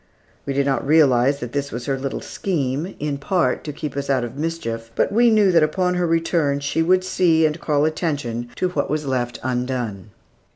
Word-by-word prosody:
We 140 - -1
did 140 0 +1
not 135 -3 0
realize 140 -2 +4
that 120 -1 -5
this 140 +1 -3
was 120 +1 -5
her 135 - 0
little 135 0 -4
scheme, 155 -1 -2
in 145 -1 -3
part, 175 +4 0
to 150 - -3
keep 150 -1 -6
us 140 0 -3
out 130 -3 +2
of 120 +1 -6
mischief; 140 -8 -4
but - - +1
we 235 +3 +4
knew 210 -4 +4
that 170 -2 +5
upon 180 +4 +1
her 180 -1 0
return 165 -3 +1
she 145 +3 -1
would 185 +3 +3
see, 165 -3 +3
and 155 +2 -1
call 150 -1 +1
attention 145 -7 -2
to 185 - 0
what 150 -6 -2
was 150 +1 -1
left 120 -3 -2
undone. 125 -5 -3
145 Hz, 205 wpm, -21 LUFS, 130-165 Hz, -, that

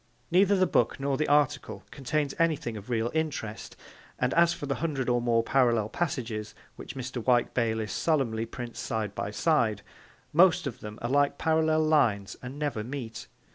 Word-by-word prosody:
Neither 195 +3 +5
the 185 -1 +3
book - - +1
nor 140 0 0
the 155 +2 0
article 145 -1 +1
contains 140 +1 -2
anything 155 -8 0
of 105 +2 -9
real 115 -1 0
interest, 145 -9 -3 0.4
and 125 0 0
as 170 0 +5
for 145 - -5
the 140 - -1
hundred 145 -6 -1
or 120 0 +2
more 115 -1 +2
parallel 120 -5 +2
passages 115 -9 -3 0.2
which - - -9
Mr. 130 -2 -5
Wyke 120 -1 +2
Bayliss 110 -2 -1
solemnly 115 -8 0
prints 120 0 -7
side 110 -3 -3
by 100 - -3
side, 110 - +1 0.5
most 175 +1 +5
of 125 -3 -5
them 105 0 -8
are 120 - -1
like 145 0 +2
parallel 160 0 +2
lines 120 -11 +2
and 130 +3 -7
never 145 -8 -2
meet. 120 -2 -6
130 Hz, 175 wpm, -28 LUFS, 115-155 Hz, 0.5 s, Neither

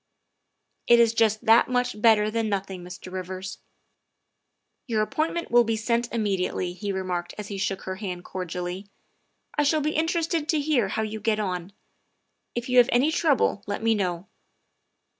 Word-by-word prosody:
''It 240 - +8
is 230 -1 +4
just 225 0 +2
that 225 +2 +6
much 250 -3 -1
better 215 -2 +5
than 225 -1 -1
nothing, 190 -2 -3
Mr. 180 +1 -9
Rivers." 185 +1 -6 0.6
" - - -53
Your 220 -3 +1
appointment 325 +8 -2
will 240 0 +6
be 225 -1 0
sent 235 +2 -1
immediately," 195 -5 -1
he 200 +2 -4
remarked 180 -2 -3
as 210 -1 -6
he 200 - -4
shook 195 -1 -2
her 185 0 -5
hand 180 -3 -5
cordially. 180 +1 -5 0.3
" - - -28
I - - +5
shall 305 +2 +2
be 305 +1 0
interested 325 -1 0
to 315 -3 +2
hear 285 -8 +1
how 220 +3 -2
you 215 0 -4
get 215 0 0
on. 180 -2 -3 0.8
If 240 0 -3
you 250 -1 +5
have 245 +1 +5
any 265 +6 +3
trouble, 295 -10 +2
let 205 +2 -3
me 225 0 +4
know. 185 -3 -2
215 Hz, 175 wpm, -25 LUFS, 190-240 Hz, 0.8 s, It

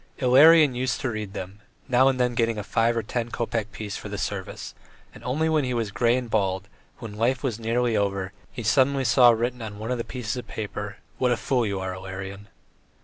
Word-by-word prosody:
Ilarion 145 +3 +6
used 125 +1 -1
to 130 -4 -1
read 105 -3 -5
them, 95 +2 -7 0.3
now 130 0 +4
and 130 -1 +1
then 125 -1 +2
getting 115 -1 0
a 105 - -3
five 115 +3 +1
or 115 - 0
ten 120 +2 -3
kopeck 115 -2 -2
piece 105 -2 -6
for 105 - -8
the 105 - -5
service, 100 -2 -5 0.4
and - - -14
only 150 +6 0
when 155 -2 +2
he 125 -1 -1
was 115 -3 -1
grey 120 +3 +2
and 125 -1 -3
bald, 95 -3 0 0.3
when 115 -4 -8
life 125 +4 +1
was 120 -5 -2
nearly 115 +1 0
over, 100 -1 -1 0.2
he 120 - -6
suddenly 135 +4 +3
saw 120 +1 +6
written 120 +2 0
on 110 -2 -6
one 110 +3 -4
of 125 - -1
the - - -1
pieces 120 -2 -4
of 125 - -6
paper: 105 -1 -5 0.2
"What 125 -1 +2
a 120 - +2
fool 125 -4 0
you 100 -1 -2
are, 95 0 -3
Ilarion." 95 +2 -7
115 Hz, 220 wpm, -25 LUFS, 105-125 Hz, 0.4 s, Ilarion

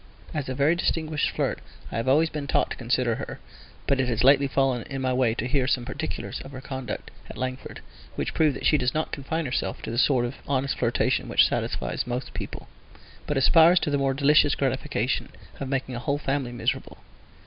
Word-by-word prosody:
As 145 -4 -3
a 130 - -2
very 145 +4 +3
distinguished 160 -3 0
flirt - - -2 0.3
I - - -3
have 115 - -2
always 155 +5 +4
been 150 -2 -4
taught - - +1
to - - -2
consider 120 -1 0
her, - - -6 0.5
but 140 - +1
it 130 - +2
has 120 -1 0
lately 140 +1 +6
fallen 135 -2 +1
in 135 -1 -4
my 130 -1 0
way 125 -3 +2
to 125 - -2
hear 130 -1 +1
some 125 -3 +1
particulars 145 +5 -4
of 135 - -11
her 130 - -6
conduct 130 -1 -6 0.2
at - - -9
Langford: 130 0 -5 0.3
which - - -2
prove 155 -4 +3
that - - -6
she 150 - +4
does 125 +1 0
not 155 - -1
confine 160 +4 -3
herself 125 -7 -2
to - - -4
that 115 - 0
sort 130 -3 +3
of 120 +3 -5
honest 135 0 0
flirtation 120 -1 +1
which - - +5
satisfies - - -2
most 125 +1 -4
people, - - -6 0.6
but 150 - 0
aspires 165 +6 +6
to 150 - -1
the 145 - +1
more 135 -1 +1
delicious 145 +1 +4
gratification 135 -2 -1 0.3
of 135 - -4
making 130 -1 -2
a 120 - -3
whole 140 +4 -1
family 135 -3 -2
miserable. 120 - -2
135 Hz, 210 wpm, -26 LUFS, 125-145 Hz, 0.6 s, lately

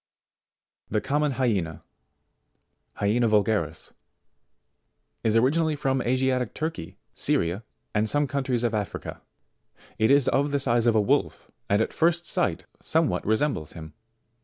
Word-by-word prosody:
68. 105 0 0
TheComnion 145 +2 +1
Hyena, 95 - -1 1.1
Hyena 110 +3 +1
Vu'garis, 105 -7 0 1.3
is 110 -1 +1
originally 150 +7 +2
from 135 -2 0
Asiatic 130 -1 0
Turkey, 155 - -5 0.2
Syria, 85 +6 -1 0.3
and 110 +1 +1
some 145 +4 +2
countries 130 -3 -1
of 115 -2 0
Africa. 105 -2 -4 0.8
It 110 +1 +3
is 140 -1 +5
of 140 +2 +1
the 140 0 0
size 120 -3 +2
of 115 - +3
a - - +5
wolf, 100 - -1 0.2
and 100 +2 +3
at - - -5
first 170 +1 +1
sight, - - -1 0.2
somewhat - - 0
resembles 110 - 0
him. 80 -2 -10
120 Hz, 130 wpm, -26 LUFS, 105-140 Hz, 1.3 s, is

